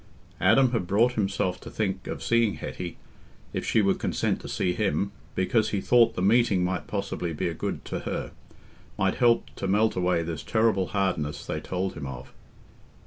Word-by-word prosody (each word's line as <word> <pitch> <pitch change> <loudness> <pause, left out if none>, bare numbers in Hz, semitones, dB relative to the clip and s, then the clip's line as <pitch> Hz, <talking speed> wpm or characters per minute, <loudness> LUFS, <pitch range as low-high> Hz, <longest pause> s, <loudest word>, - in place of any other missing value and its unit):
Adam 115 +7 +5
had 115 -8 -1
brought 110 +6 +3
himself 95 -4 -1
to - - -9
think 95 -4 -2
of - - -5
seeing 115 -3 +2
Hetty, 90 -2 -6 0.6
if - - -2
she 110 - +2
would 100 -1 +2
consent - - -1
to - - -8
see 90 - 0
him, 100 0 0 0.2
because 110 +4 +2
he 100 - -1
thought 115 +2 +4
the 90 - -1
meeting 105 -3 +4
might 90 +1 -2
possibly 100 -4 -3
be 75 - -1
a - - -2
good - - -4
to - - -3
her—might 95 0 -5
help 120 -2 +3
to 95 - -2
melt 105 +3 +2
away 90 -2 +1
this 80 -3 -4
terrible 110 -5 +2
hardness 80 -8 -1
they - - -3
told 95 +1 -3
him 70 - -6
of. 65 -2 -8
95 Hz, 180 wpm, -27 LUFS, 90-110 Hz, 0.6 s, Adam